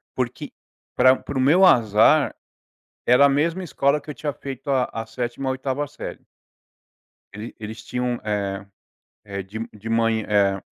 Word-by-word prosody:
porque 130 +3 -3 0.4
pra 130 +1 +6
para 140 - -5
o - - +2
meu 165 +8 +5
azar, 115 - +4 0.7
era 125 +4 +6
a - - +5
mesma 165 +6 0
escola 140 -2 +1
que 150 - -10
eu - - -6
tinha 150 -1 -3
feito 135 0 -7
a 130 -2 +3
a 115 0 -5
7ª, 120 +3 -4
8ª 130 +2 -2
série. 150 - -8 1.1
Ele 105 +3 -8
eles 110 +1 -8
tinham, 125 -1 -2
eh 100 -2 -2 0.6
eh, 100 -1 -5
de 100 +4 -8
m 115 +1 -5
de 110 +1 -9
mã 115 0 +2
eh, 100 -3 +1
125 Hz, 160 wpm, -23 LUFS, 110-140 Hz, 1.1 s, pra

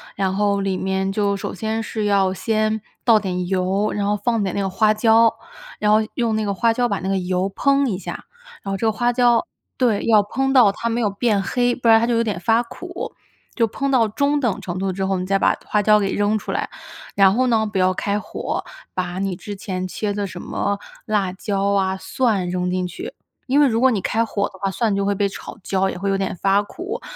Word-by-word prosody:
然 190 -1 0
后 200 -1 +1
里 195 -1 -1
面 190 0 -1
就 200 0 0
首 - - -5
先 220 +3 -2
是 220 -1 -3
要 195 -2 +2
先 215 +1 0 0.2
倒 225 -3 +5
点 180 -3 -3
油， 190 +2 0
然 205 -1 -1
后 205 +1 +1
放 225 0 0
点 190 - -2
那 200 - 0
个 195 - -1
花 215 +3 +3
椒， 225 +1 +4 0.5
然 210 0 +2
后 215 - +6 0.2
用 230 -2 0
那 215 -1 -1
个 200 - -1
花 230 +4 +2
椒 245 +1 +1
把 200 -5 -2
那 190 +3 -3
个 195 - +1
油 185 +1 -1
烹 275 -1 +2
一 195 - -1
下， 190 - -7 0.4
然 195 - -5
后 195 - -1
这 225 - -2
个 220 - +3
花 240 +3 +1
椒 240 -1 +3 0.3
对， 235 -6 +1
要 215 -2 +5
烹 270 +6 -1
到 235 -7 +6
它 230 +3 -4
没 235 +1 -1
有 210 - +2
变 205 0 +1
黑， 245 +5 +1
不 240 -2 -3
然 225 0 +7
它 230 - +1
就 240 - 0
有 230 - +2
点 205 -6 -2
发 225 +3 +3
苦， 245 +1 -7 0.4
就 230 -2 +2
烹 275 +6 -3
到 245 -4 +3
中 280 +7 +1
等 240 -7 -1
程 175 0 -5
度 190 0 -1
之 195 - -3
后， 190 -1 0
你 180 - -3
再 195 +1 +1
把 - - +3
花 210 - +1
椒 210 +1 +5
给 195 -1 -1
扔 205 +1 +1
出 - - -5
来， - - -2 0.5
然 195 -1 +5
后 255 +3 +2
呢 225 -3 +2
不 205 -2 -2
要 185 0 +4
开 205 0 -1
火， 210 - -4 0.3
把 180 0 -3
你 195 -1 -2
之 205 +3 -7
前 185 -2 -4
切 205 +2 -3
的 200 -1 -2
什 175 0 -8
么 200 0 -2 0.3
辣 200 -4 0
椒 200 0 -1
啊、 190 -1 +1
蒜 200 -1 0
扔 180 0 -1
进 180 0 -1
去， 180 - -7 0.3
因 275 +3 +3
为 290 - +6
如 230 0 0
果 260 - +6
你 215 - 0
开 225 +1 +1
火 200 -2 -1
的 190 - -16
话， 195 - 0
蒜 210 0 0
就 200 - 0
会 200 0 +1
被 200 +1 +1
炒 195 - -9
焦， 190 0 0
也 - - -5
会 195 +2 -2
有 195 - +1
点 195 -1 -2
发 195 +3 +2
苦， 365 - -6
205 Hz, 265 characters per minute, -21 LUFS, 195-225 Hz, 0.5 s, 然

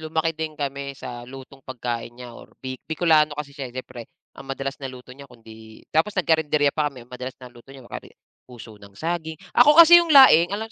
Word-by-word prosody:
lumaki 160 +1 -2
din 155 -1 -6
kami 140 -1 -5
sa 120 0 -9
lutong 135 +1 -13
pagkain 120 -2 -6
niya 125 -1 -11
or - - -14 0.2
Bi 130 -1 -6
Bikolano 155 -2 +2
kasi 145 -1 -7
siya, 140 -2 -7
eh, - - -16
siyempre, 120 -2 -9 0.2
ang 135 - -14
madalas 135 +1 -5
na 135 - -6
luto 125 0 -12
niya 140 +1 -14
kundi 110 -2 -16
tapos 180 +6 0
nagkarinderya 155 -4 +1
pa 150 -1 -1
kami, 130 -4 -14
ang 125 - -25
madalas 125 +1 -8
na 125 -1 -14
luto 120 +2 -19
niya 135 -2 -14
ma - - -19
kari - - -8 0.4
puso 120 -3 -13
ng 100 -1 -17
saging. 160 0 -4 0.2
Ako 295 +5 +5
kasi 335 +1 +9
yung 340 - -3
laing 260 - +7
alam 205 +3 -4
140 Hz, 220 wpm, -22 LUFS, 125-160 Hz, 0.4 s, kasi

